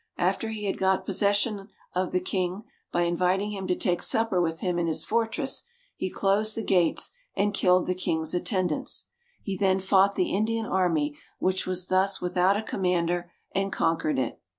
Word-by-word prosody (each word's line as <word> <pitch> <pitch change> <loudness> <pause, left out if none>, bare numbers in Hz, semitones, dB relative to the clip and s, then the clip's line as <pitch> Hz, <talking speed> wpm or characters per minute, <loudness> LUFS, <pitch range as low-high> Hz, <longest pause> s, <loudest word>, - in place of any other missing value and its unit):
After 225 - 0
he 215 -1 -5
had 195 - -2
got 190 0 +2
possession 200 +1 +1 0.3
of 185 0 -1
the 180 - +2
king 185 +2 -2 0.3
by 175 - +1
inviting 180 +4 +1
him 195 -2 -5
to 180 - +1
take 175 -1 0
supper 225 -5 +2
with 165 -1 -2
him 180 -2 0
in 170 - 0
his 160 - 0
fortress, 230 +5 0 0.3
he 190 - -3
closed 205 +4 +1
the 225 - -2
gates 180 -4 +2 0.2
and 205 +1 +1
killed 180 -2 +3
the 185 - 0
king's 160 -3 -1
attendants. 180 -2 -1 0.3
He 195 - -3
then 190 0 +2
fought 195 +1 +3
the 185 - 0
Indian 225 +2 0
army, 165 -7 +1 0.2
which 185 0 0
was 180 -1 +1
thus 190 +1 +2
without 180 +2 +2
a 215 - -3
commander, 175 -3 -1 0.2
and 195 0 0
conquered 165 -2 0
it. 130 - -2
185 Hz, 175 wpm, -27 LUFS, 180-200 Hz, 0.3 s, killed